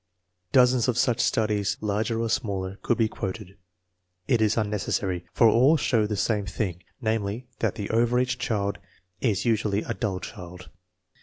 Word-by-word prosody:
Dozens 125 -1 +4
of 125 -2 +1
such 120 -2 +2
studies, 105 -3 +1
larger 105 +2 -1
or 115 - 0
smaller, 95 -3 -2
could 120 - +1
be 115 - +3
quoted. 95 -2 -6 0.7
It 115 - +2
is 110 0 +2
unnecessary, 100 -4 -1
for 115 - +5
all 130 +8 +5
show 115 -6 +1
the 105 -1 -2
same 105 +1 0
thing: 90 -5 -3 0.2
namely, 110 +1 -1
that - - 0
the 105 -3 -4
over 120 +2 +2
age 125 0 0
child 100 -5 -1 0.4
is 110 -5 0
usually 105 -3 +1
a - - -3
dull 100 -5 -2
child. 90 0 -10
110 Hz, 160 wpm, -26 LUFS, 100-115 Hz, 0.7 s, for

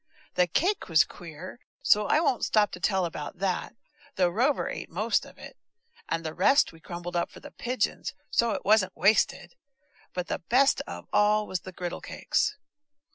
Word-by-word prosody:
The 180 -1 +3
cake 360 - 0
was 160 -1 +6
queer, 175 +6 -10 0.2
so 210 0 +4
I 305 - +4
won't 260 -7 +1
stop 210 -1 +3
to - - -7
tell 190 -3 +1
about 165 +1 -6
that, 190 +4 -2 0.4
though 180 -2 +3
Rover 250 +10 +1
ate - - -5
most - - 0
of - - -16
it, - - -11 0.5
and 165 0 -2
the 155 - -3
rest 270 - +4
we 165 - -16
crumbled 175 +1 -7
up 170 - 0
for - - -13
the - - -11
pigeons, 245 -3 -2 0.2
so 235 - +3
it - - -5
wasn't 200 -2 +3
wasted; 200 - +2 0.6
but 180 -1 -2
the - - -3
best 255 +10 +3
of 85 0 -7
all 210 +1 +4
was 185 -3 -3
the 185 - -10
griddle 175 -1 -5
cakes. - - -1
185 Hz, 185 wpm, -27 LUFS, 175-220 Hz, 0.6 s, was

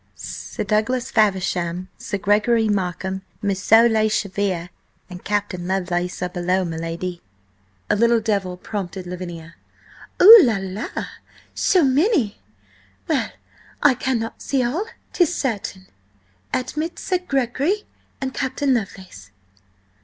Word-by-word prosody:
"Sir - - -6
Douglas 235 +4 0
Faversham, 185 -4 +1
Sir 200 - -4
Gregory 210 +3 +2
Markham, 190 -1 -2 0.2
Moosso 205 +4 +5
le 220 -1 +2
Chevalier 195 -4 -1 0.4
and 180 0 -9
Captain 200 -4 -2
Lovelace 180 -1 -1
are 180 - -1
below, 180 +1 0
m'lady." 165 +2 -4 0.7
A - - +2
little 235 +2 +4
devil 200 -5 -1
prompted 190 -1 -5
Lavinia. 175 -2 -7 0.7
"Oh, 435 +4 +11
la 230 -6 +2
la! 190 +3 -5 0.7
So 365 -3 +3
many? 280 - +2 0.7
Well, - - 0 0.5
I 290 -2 +7
cannot 245 -3 -2
see 270 -2 0
all, 300 - -1 0.3
'tis 350 -1 +2
certain. 200 -7 -3 0.7
Admit 305 +7 -2
Sir 370 -2 -1
Gregory 280 - 0 0.4
and 265 -1 -3
Captain 270 0 0
Lovelace." 190 - -5
205 Hz, 115 wpm, -22 LUFS, 185-255 Hz, 0.7 s, Oh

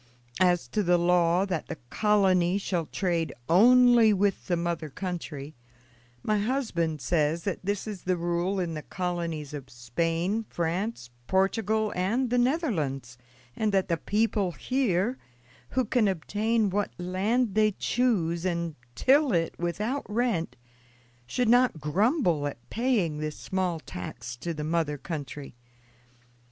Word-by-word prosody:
As 175 -7 +3
to 210 - 0
the 175 -2 +3
law 175 +1 +3
that 180 -5 -3
the - - -5
colony 190 -4 +3
shall 175 -5 -2
trade 170 -6 -1
only 235 +4 +6
with 200 0 0
the 175 - +1
mother 170 -2 -2
country, 155 -4 -5 0.7
my 215 -1 +1
husband 200 - -1
says 155 +4 +1
that 200 - -2
this 200 +1 -2
is 210 -4 -6
the 180 0 0
rule 175 +3 -1
in 175 -3 -2
the 155 - -4
colonies 170 -5 -4
of 140 -3 -7
Spain, 165 - -1
France, 170 - -3 0.2
Portugal, 215 +3 +1
and 230 +8 0
the 245 - +3
Netherlands, 160 - -1 0.4
and 215 -1 0
that 190 0 +1
the 170 - +3
people 205 -2 0
here, 245 -2 0 0.5
who 255 -1 0
can 225 -1 +2
obtain 210 +4 0
what 205 +1 0
land 195 +6 0
they 215 +1 +4
choose 185 -9 0
and 170 -3 -1 0.2
till 275 - +4
it 165 -1 +1
without 210 - -2
rent, 215 -6 0 0.7
should 245 - 0
not 245 -6 +4
grumble 175 - +1
at 120 -4 -8
paying 215 -11 0
this 155 0 -3
small 185 -3 -2
tax 120 -2 -7
to 170 +8 -4
the 150 -2 -4
mother 155 -2 0
country. 145 -2 -6
180 Hz, 140 wpm, -27 LUFS, 165-215 Hz, 0.7 s, only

